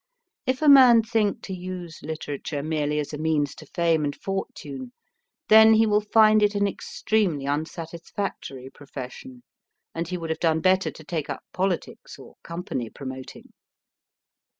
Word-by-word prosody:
If 260 +3 0
a - - +3
man 255 -5 +8
think 220 -2 0
to 190 - -6
use 180 -3 -7
literature 150 -2 -5
merely 150 -1 -1
as 150 0 -3
a 150 - -5
means 155 -2 0
to - - -13
fame 165 -3 +1
and 145 -1 -2
fortune, 195 - -6 0.5
then 220 +1 +8
he 225 +1 +5
will 210 -1 +3
find 215 0 +5
it 210 0 +2
an 200 0 +2
extremely 215 - -1
unsatisfactory 155 -2 -5
profession, 145 - -10 0.5
and 165 0 -3
he 180 +1 -3
would 165 -2 -4
have 160 - -3
done 160 -2 +2
better 185 +2 +2
to 155 - -12
take 160 -1 -4
up - - -5
politics 185 -1 -3
or - - -14
company 170 - -5
promoting. 130 0 -9
170 Hz, 150 wpm, -25 LUFS, 150-215 Hz, 0.5 s, man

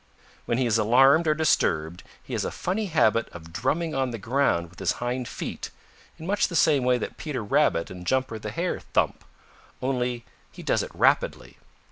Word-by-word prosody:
"When 115 - 0
he 130 - +1
is 115 -1 +2
alarmed 135 +9 +5
or 155 - +3
disturbed, 85 - +1 0.2
he - - -9
has - - -1
a - - -1
funny 200 +4 -2
habit 115 - +2
of 80 -1 -12
drumming 155 - -1
on 135 -1 0
the 115 - -5
ground 110 -7 0
with 90 - -15
his 95 - +1
hind 125 0 -3
feet - - -6 0.5
in 160 - -9
much 205 +3 +1
the 170 - -6
same 145 -5 +4
way 125 0 +3
that 120 - -6
Peter 140 -7 -4
Rabbit 85 -4 +1
and 90 -1 -8
Jumper 130 -4 0
the 105 - -5
Hare 170 +12 -2
thump, - - -1 0.6
only 125 -2 -2 0.3
he - - -11
does - - +1
it - - -5
rapidly. - - +1
125 Hz, 190 wpm, -26 LUFS, 110-150 Hz, 0.6 s, alarmed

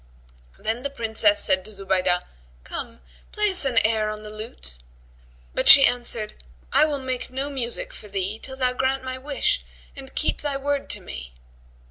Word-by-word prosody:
Then 225 +3 -2
the 280 - -2
Princess 220 -5 +2
said 185 0 +2
to 215 - -9
Zubaydah, 190 -3 0 0.4
"Come, - - -7 0.3
play 420 -1 +3
us 365 -6 +3
an 255 -4 0
air 220 -1 +2
on 215 0 -6
the 210 - -9
lute." 215 - -9 0.7
But - - 0
she 275 0 +11
answered, 235 - -1 0.3
"I - - +6
will 295 -2 -1
make 260 -2 -4
no 270 +3 -3
music 275 - -4
for 210 - -11
thee, 200 +2 -3
till 265 +2 -7
thou 255 -1 +1
grant 265 +1 0
my 260 0 -4
wish 290 - -1 0.3
and 270 -1 -10
keep 315 - +1
thy 285 -2 -1
word 280 0 -2
to - - -1
me." 65 -1 -9
245 Hz, 175 wpm, -24 LUFS, 210-275 Hz, 0.7 s, she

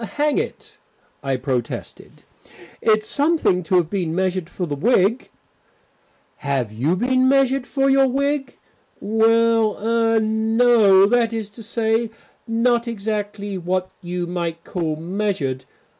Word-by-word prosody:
"Hang 295 0 +2
it," - - -7 0.4
I 135 -2 -1
protested, 125 -2 -5 0.6
"it's 215 -1 +2
something 290 - +1
to 185 +2 -1
have 175 -3 +3
been 175 -5 -2
measured 185 -2 -1
for 180 - -4
the 150 - -4
wig." 210 - +1 1.1
"Have 135 -6 -2
you 135 +11 0
been 255 +5 +2
measured 270 -1 +2
for 275 -1 0
your 270 0 +4
wig?" 280 +2 -2 0.4
"Well 225 0 +2
er 225 +1 +1
no. 220 -2 +4
That 230 +1 +1
is 220 -2 -4
to 230 - -12
say, 225 0 -1 0.4
not 235 +1 +1
exactly 205 -2 -4
what 185 +1 -2
you 175 0 -4
might 170 -1 -4
call 165 -4 -3
measured. 165 -7 -3
215 Hz, 130 wpm, -21 LUFS, 180-235 Hz, 1.1 s, your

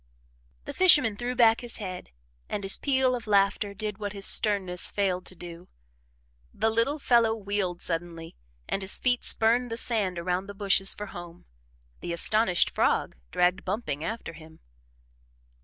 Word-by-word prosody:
The - - -6
fisherman 295 - +5
threw 245 +3 -4
back 230 -1 +4
his 240 -1 -8
head, 185 -4 -7 0.4
and 205 - -4
his 195 - +2
peal 265 -2 +1
of 240 -3 -5
laughter 200 0 +1
did 210 0 -5
what 205 -1 -5
his 200 -1 -3
sternness 190 -4 +4
failed 185 -3 -2
to 185 - -11
do. 175 0 -10 0.8
The 220 +2 0
little 230 +7 +1
fellow 235 -5 +2
wheeled 200 -4 -3
suddenly, 165 -1 -5 0.3
and 195 - -2
his 190 0 +1
feet 245 -1 +1
spurned 235 +2 +1
the 230 - -4
sand 210 -7 0
around 180 +2 -2
the 200 - -9
bushes 195 -1 +3
for 210 - -6
home 175 -3 -11 0.5
the 170 - -5
astonished 190 +1 +2
frog - - 0
dragged 180 - +1
bumping 185 -7 -4
after 220 -2 -5
him. 160 0 -15
200 Hz, 155 wpm, -27 LUFS, 180-225 Hz, 0.8 s, fisherman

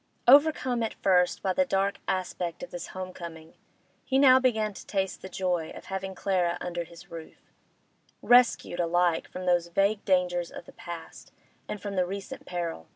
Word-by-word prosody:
Overcome 260 -3 +5
at 225 - -2
first 180 -2 +2
by 190 - +1
the 280 - +3
dark 200 -5 0
aspect 180 -1 -3
of 265 - -8
this 175 -1 -6
home 185 0 -7
coming, 165 -2 -9 0.5
he 265 - 0
now 260 -2 +7
began 220 -5 +1
to - - -11
taste 195 -2 -2
the 190 - -8
joy 180 -3 -1
of - - -11
having 190 0 -5
Clara 180 -3 0
under 175 -1 -4
his 170 +1 -15
roof, 165 -1 -11 0.7
rescued 245 -7 +4
alike 175 0 +1
from 185 0 -7
those 175 -1 +2
vague 200 +4 +1
dangers 180 -2 +1
of - - -10
the - - -13
past 170 -1 -9 0.4
and 210 - -5
from 200 -1 -5
the 180 - +3
recent 195 +1 -7
peril. 170 - -4
185 Hz, 175 wpm, -28 LUFS, 175-200 Hz, 0.7 s, now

